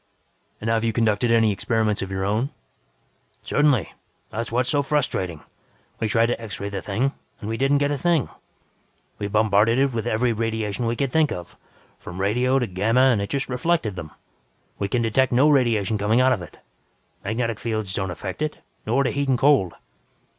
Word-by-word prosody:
"And 110 - -5
have 115 0 +1
you 115 -1 0
conducted 115 +1 +1
any 115 -2 +4
experiments 105 +1 0
of 95 - -4
your 95 0 -2
own?" 110 +7 0 0.9
"Certainly. 145 - +2 0.4
That's 115 +1 -4
what 120 +2 +2
is - - -6
so 145 -2 +2
frustrating. 120 - -1 0.6
We 110 - 0
try 115 +2 +3
to 115 0 -2
X 110 -2 -6
ray 100 - -3
the 100 -2 -4
thing, 120 +7 0 0.3
and 105 - -7
we 110 - -2
don't 135 +4 +2
get 145 0 +1
a 145 - -2
thing. 170 -2 +2 0.9
We 100 - -2
bombarded 110 +2 +3
it 135 -1 +2
with 115 -2 -2
every 115 +2 +1
radiation 110 0 -2
we 115 - 0
could 135 +1 -1
think 155 0 +3
of, 90 -1 -7 0.4
from 90 +2 -8
radio 125 +7 +2
to 125 - +1
gamma 115 +7 +3
and 110 -5 +1
it 100 - -3
just 140 -2 -1
reflected 125 - 0
them. 80 -3 -7 0.7
We 100 - 0
can 120 +3 0
detect 125 +4 +2
no 135 +5 +5
radiation 115 -6 +2
coming 105 +4 +2
out 130 0 +5
of 100 - -3
it. 85 - -11 0.7
Magnetic 115 +2 -2
fields 110 -4 -3
don't 95 -1 -2
effect 95 +6 -6
it, 155 0 -2 0.3
nor 130 +5 +2
do - - 0
heat 140 -1 -1
and 130 - +3
cold. 135 - +3
115 Hz, 195 wpm, -23 LUFS, 105-130 Hz, 0.9 s, no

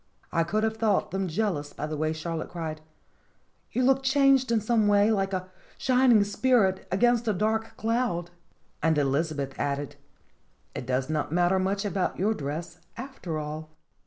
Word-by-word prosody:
I 165 - +2
could 210 +6 -1
have 220 0 0
thought 215 -3 +1
them 190 0 -1
jealous 165 -5 -2
by 150 - -4
the 155 0 -4
way 155 +1 0
Charlotte 160 0 -4
cried: 160 -3 -5 0.9
"You 255 - 0
look 265 +1 +4
changed 270 -2 +3
in 230 - +3
some 220 0 +2
way 205 +1 +4
like 195 -2 0
a 185 -1 -4 0.3
shining 250 -4 +4
spirit 205 -2 +2
against 240 +4 +2
a 215 - +3
dark 220 +3 -1
cloud!" 220 -7 -1 0.5
And 160 0 +2
Elizabeth 140 0 0
added: 140 0 -2 0.8
"It 125 - -6
does 130 0 0
not 155 -1 -2
matter 175 +2 +3
much 195 +2 -1
about 190 -2 -1
your 210 +4 +2
dress, 165 +2 -5 0.2
after 235 - -5
all 155 +1 -6
190 Hz, 160 wpm, -27 LUFS, 155-220 Hz, 0.9 s, look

